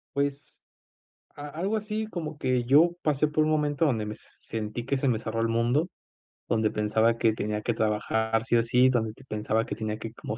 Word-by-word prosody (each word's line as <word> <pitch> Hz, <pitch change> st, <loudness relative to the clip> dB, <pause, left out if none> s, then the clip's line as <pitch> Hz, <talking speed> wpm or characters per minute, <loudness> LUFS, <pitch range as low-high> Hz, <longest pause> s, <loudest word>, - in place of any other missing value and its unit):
Pues 140 Hz, 0 st, -2 dB, 0.8 s
a 145 Hz, -, -7 dB
algo 180 Hz, +9 st, -2 dB
así 215 Hz, +1 st, -3 dB
como 160 Hz, -7 st, -6 dB
que 125 Hz, -3 st, 0 dB
yo 150 Hz, +7 st, +5 dB
pasé 150 Hz, 0 st, +2 dB
por 155 Hz, +1 st, +2 dB
un 155 Hz, -, +1 dB
momento 150 Hz, 0 st, +1 dB
donde 115 Hz, -8 st, +1 dB
me 105 Hz, -, -4 dB
s -, -, -15 dB
sentí 110 Hz, +1 st, -4 dB
que 140 Hz, +3 st, 0 dB
se 135 Hz, +1 st, 0 dB
me 115 Hz, -3 st, +2 dB
cerró 115 Hz, 0 st, -3 dB
el 115 Hz, -, +1 dB
mundo, 120 Hz, +8 st, +1 dB, 0.6 s
donde 110 Hz, -2 st, +2 dB
pensaba 110 Hz, +2 st, +2 dB
que 115 Hz, -1 st, +3 dB
tenía 105 Hz, 0 st, -2 dB
que 120 Hz, -, 0 dB
trabajar 110 Hz, +1 st, 0 dB
sí 115 Hz, -, +1 dB
o 115 Hz, -, +4 dB
sí, 125 Hz, +2 st, +4 dB
donde 110 Hz, -4 st, 0 dB
t 135 Hz, -, -17 dB
pensaba 110 Hz, +1 st, -1 dB
que -, -, -4 dB
tenía 110 Hz, -1 st, -3 dB
que 110 Hz, 0 st, -7 dB
como 110 Hz, -1 st, -6 dB
120 Hz, 215 wpm, -27 LUFS, 110-145 Hz, 0.8 s, yo